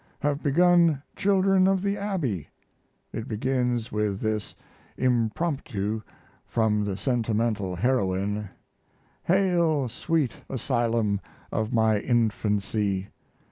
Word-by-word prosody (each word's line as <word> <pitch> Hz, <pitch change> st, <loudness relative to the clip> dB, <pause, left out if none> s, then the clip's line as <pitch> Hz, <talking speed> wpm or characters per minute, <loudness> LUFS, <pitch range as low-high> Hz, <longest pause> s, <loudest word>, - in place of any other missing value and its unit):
Have 145 Hz, 0 st, 0 dB
begun 170 Hz, -1 st, +4 dB
Children 195 Hz, -1 st, +3 dB
of 195 Hz, -1 st, +2 dB
the 200 Hz, 0 st, +1 dB
Abbey. 170 Hz, -, -2 dB, 0.7 s
It 115 Hz, +2 st, -4 dB
begins 125 Hz, 0 st, -1 dB
with 105 Hz, -2 st, -1 dB
this 110 Hz, -1 st, -2 dB, 0.4 s
"Impromptu" 115 Hz, -3 st, 0 dB, 0.4 s
from 110 Hz, -2 st, +1 dB
the 100 Hz, -2 st, -2 dB
sentimental 110 Hz, -4 st, 0 dB
heroine: 105 Hz, -2 st, 0 dB, 0.8 s
"Hail, 170 Hz, -6 st, +2 dB
sweet 150 Hz, +3 st, -1 dB
asylum 115 Hz, -5 st, 0 dB, 0.3 s
of 110 Hz, +1 st, -1 dB
my 110 Hz, -3 st, +3 dB
infancy! 105 Hz, -4 st, 0 dB
115 Hz, 95 wpm, -26 LUFS, 105-150 Hz, 0.8 s, begun